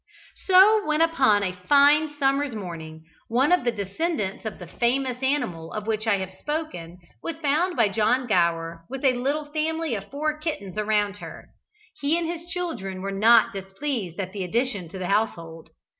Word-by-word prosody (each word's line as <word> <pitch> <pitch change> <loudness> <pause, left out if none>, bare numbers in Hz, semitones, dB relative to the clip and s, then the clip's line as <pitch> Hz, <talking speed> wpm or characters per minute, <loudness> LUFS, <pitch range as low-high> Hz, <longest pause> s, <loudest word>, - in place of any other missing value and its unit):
So 400 +3 +7
when, 305 -3 0
upon 270 -11 +3
a 185 -2 -1
fine 290 +10 +4
summer's 275 -2 +1
morning, 160 -5 -7 0.2
one 260 +7 +2
of 360 - +4
the 240 - +1
descendants 210 - -3
of 220 - -4
the 180 - -9
famous 250 +6 -1
animal 180 - -1
of 215 -1 -4
which 215 0 -2
I 210 -2 +3
have 190 -1 -5
spoken 295 - -5 0.2
was 330 -2 -5
found 325 +4 +1
by 230 -5 +4
John 225 +5 +1
Gower 170 -5 0
with 270 +1 -5
a 260 - +5
little 280 +5 -1
family 320 -1 -1
of 200 -2 -5
four 305 +2 -2
kittens 250 - -4
around 210 -1 0
her, - - -10 0.5
he 290 +4 +1
and 340 - -1
his 335 +1 -5
children 255 - -4
were 195 - -3
not 220 +4 +5
displeased 195 - -4
at 185 -1 -4
the 200 -2 -3
addition 200 -2 -1
to 190 - -8
their 185 -1 -4
household. 170 -6 -2
230 Hz, 175 wpm, -25 LUFS, 195-295 Hz, 0.5 s, So